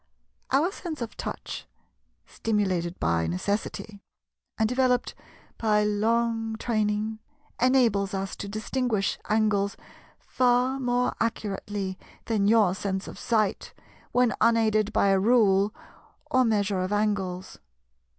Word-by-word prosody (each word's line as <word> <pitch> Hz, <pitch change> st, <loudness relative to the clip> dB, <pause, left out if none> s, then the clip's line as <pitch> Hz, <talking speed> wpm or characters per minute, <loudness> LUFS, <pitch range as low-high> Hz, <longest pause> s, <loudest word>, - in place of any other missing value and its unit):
Our 295 Hz, +8 st, +2 dB
sense 335 Hz, -5 st, -6 dB
of 230 Hz, -, -8 dB
touch, -, -, -6 dB, 0.6 s
stimulated 190 Hz, -5 st, -1 dB
by 85 Hz, -1 st, +1 dB
necessity, 200 Hz, -, -3 dB, 0.6 s
and 220 Hz, -, +2 dB
developed 250 Hz, 0 st, +1 dB, 0.5 s
by 210 Hz, -2 st, +2 dB
long 225 Hz, +2 st, 0 dB
training, 215 Hz, -1 st, -1 dB, 0.4 s
enables 230 Hz, -7 st, +3 dB
us 195 Hz, 0 st, -3 dB
to 200 Hz, -, -5 dB
distinguish 215 Hz, -1 st, -1 dB
angles 210 Hz, -2 st, +1 dB, 0.4 s
far 250 Hz, +1 st, +1 dB
more 245 Hz, -1 st, +1 dB
accurately 205 Hz, -3 st, -3 dB, 0.3 s
than 210 Hz, -3 st, +1 dB
your 210 Hz, -4 st, +4 dB
sense 190 Hz, 0 st, -3 dB
of -, -, -9 dB
sight, 215 Hz, -4 st, 0 dB, 0.4 s
when 245 Hz, -1 st, +3 dB
unaided 220 Hz, -2 st, +3 dB
by 200 Hz, -, +3 dB
a 195 Hz, -1 st, +4 dB
rule 205 Hz, -2 st, +4 dB, 0.6 s
or 255 Hz, 0 st, +4 dB
measure 205 Hz, -3 st, +1 dB
of 185 Hz, +2 st, -2 dB
angles. 195 Hz, -3 st, -1 dB
215 Hz, 110 wpm, -26 LUFS, 200-235 Hz, 0.6 s, your